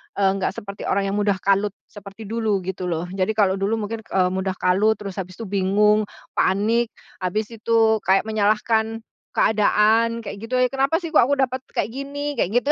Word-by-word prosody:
eee, 195 -1 +3
nggak 185 - -1
seperti 200 0 -7
orang 195 0 0
yang 200 - -1
mudah 205 -1 +2
kalut 200 +1 +2 0.2
seperti 205 +1 -11
dulu 215 -3 -1
gitu 185 0 -4
loh, 165 -1 -2
jadi 190 +3 -1
kalau 195 -2 +2
dulu 200 +3 0
mungkin, 225 +1 -4
eee, 190 -4 0
mudah 190 0 -2
kalut 200 +5 +2
terus 200 -2 -7
habis 185 -1 -6
itu 225 - -7
bingung, 205 +1 +2 0.2
panik, 220 +5 +1 0.3
habis 210 +5 -2
itu 225 0 +2
kayak 195 -1 +2
menyalahkan 220 +1 0 0.3
keadaan, 220 +2 +2
kayak 200 0 -7
gitu, 235 +3 -2 0.2
"Kenapa 275 +4 +2
sih 335 -2 -6
kok - - +7
aku 280 +4 +2
dapat 260 -1 0
kayak - - -1
gini?" 285 +2 -4
kayak 180 - 0
gitu. 245 +7 +2
210 Hz, 185 wpm, -22 LUFS, 195-230 Hz, 0.3 s, kok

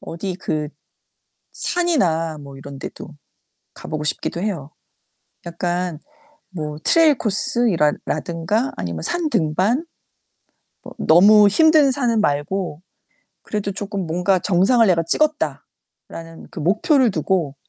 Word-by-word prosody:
어디 185 +3 -5
그 150 -5 -3 0.9
산이나 170 - 0
뭐 140 -1 -11
이런 135 0 -10
데도 - - -8 0.6
가 - - -12
보고 155 -1 -4
싶기도 170 +3 -3
해요. 170 -8 -4 0.7
약간 175 -1 -3 0.5
뭐 150 -5 -5
트레일 320 -5 +4
코스 235 +3 0
이랄 150 -4 +1
라든가 170 - -2
아니면 85 -3 -5
산 340 -3 -2
등반. 190 - +1 1.0
어 - - -9
너무 205 +5 +6
힘든 310 +4 +5
산은 245 -4 0
말고 155 +1 -2 0.6
그래도 205 -2 -3
쪼끔 195 -2 -5
뭔가 180 +3 +1
"정상을 205 +7 +3
내가 170 -3 +2
찍었다."라는 165 - -4
그 205 - -9
목표를 240 - +2
두고. 160 -3 -1
185 Hz, 235 characters per minute, -20 LUFS, 160-225 Hz, 1.0 s, 너무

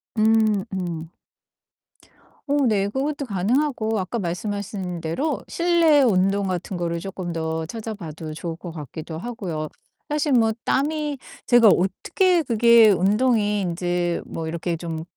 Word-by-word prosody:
음 215 -2 +3
음. 170 -3 -4 1.4
어 285 -1 +2
네. 200 -3 +2
그것도 280 +5 -2
가능하고 220 +2 0
아까 190 +5 -3
말씀하신 190 -1 -4
대로 265 - -2
실내 335 -4 +4
운동 195 -3 +2
같은 185 0 -3
거를 170 -1 -2
쪼끔 185 -3 -5
더 160 0 -2
찾아봐도 170 -7 -7
좋을 165 +1 -5
것 170 0 -8
같기도 160 +1 -7
하고요. 175 -8 -4 0.4
사실 295 0 0
뭐 225 -3 +4
땀이 295 +1 0 0.3
제가 240 -2 +6
어떻게 335 - +2
그게 235 -2 +6
운동이 210 +2 +2
인제 175 -1 -1
뭐 160 -1 -5
이렇게 170 +1 -3
좀 160 -1 -5
200 Hz, 255 characters per minute, -23 LUFS, 170-240 Hz, 1.4 s, 제가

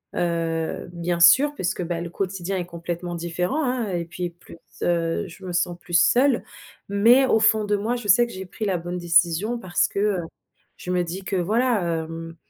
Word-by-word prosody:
heu, 165 -1 -2
bien 170 0 -2
sûr 260 +13 +6
puisque, 180 -8 -2
bah, 170 0 -3
le 170 - -5
quotidien 190 0 -3
est 180 - -3
complètement 175 0 -5
différent, 175 - -2
hein 250 -4 -1
et 170 -2 -2
puis 175 +1 -5
plus, 170 0 -15 0.2
heu, 170 +3 0
je 185 +2 -12
me 180 - -5
sens 175 0 0
plus 175 - -12
seule. 250 +5 +3 0.5
Mais, 235 +7 +5
au 225 - +3
fond 220 -1 +3
de 205 0 +1
moi, 215 +4 -1
je 235 - -8
sais 220 +5 +6
que 235 - -10
j'ai 190 0 -7
pris 215 - -5
la 190 -3 0
bonne 175 +2 -5
décision 175 +6 +2
parce 185 -3 +1
que, 200 - -4
heu, 205 -2 +1 0.6
je - - -9
me 180 -1 +1
dis 180 +3 -6
que, 190 +1 -3
voilà 220 +5 +1 0.3
hem, 165 0 -8
180 Hz, 200 wpm, -23 LUFS, 170-210 Hz, 0.6 s, sûr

